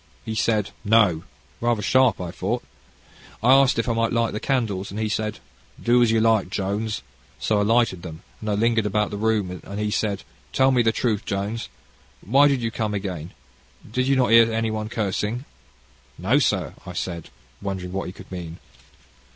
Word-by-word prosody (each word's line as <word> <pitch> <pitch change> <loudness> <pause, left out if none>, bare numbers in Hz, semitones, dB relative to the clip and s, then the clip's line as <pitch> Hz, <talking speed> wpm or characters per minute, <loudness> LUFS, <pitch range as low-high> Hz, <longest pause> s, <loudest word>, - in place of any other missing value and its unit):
He 110 - -3
said, 110 -2 +1
No, 105 -7 +3 0.3
rather 120 -3 0
sharp, 130 -1 +4
I 90 -2 -4
thought. - - -2 0.8
I 125 +3 +7
asked 135 -2 +5
him - - +4
if - - -10
I - - +2
might 115 0 +1
light 115 -1 +1
the 105 - -2
candles, 110 -8 -1
and 100 - -5
he 110 - 0
said, 110 0 -2 0.4
'Do 120 +1 +3
as 120 - +4
you 115 0 +3
like, 110 -4 +3
Jones.' 105 +3 -2 0.3
So 105 -2 +1
I - - +2
lighted 115 -4 +2
them, 80 -2 -9 0.2
and 110 - -4
I - - +1
lingered 115 0 +2
about 105 +1 0
the 105 - -4
room, 105 -4 0
and 100 +1 -6
he 105 0 -1
said, 105 -2 -1 0.3
'Tell 130 0 +4
me 125 -2 +4
truth, 115 -1 +1
Jones; 100 +4 -3 0.6
why 135 +8 +5
did 135 -4 +1
you 115 - -1
come 110 -2 -2
again 90 -5 -4 0.6
you - - -15
did 135 +1 +2
not 125 -3 +2
hear 115 0 +7
anyone 110 -1 -1
cursing?' 110 +3 -2 0.7
'No, 110 +11 +2
sir,' 95 - 0
I - - -8
said, 85 -3 -4 0.3
wondering 95 -2 -4
what 95 +1 -3
he - - -5
could 95 - -14
mean. 85 -2 -6
110 Hz, 190 wpm, -23 LUFS, 100-115 Hz, 0.8 s, I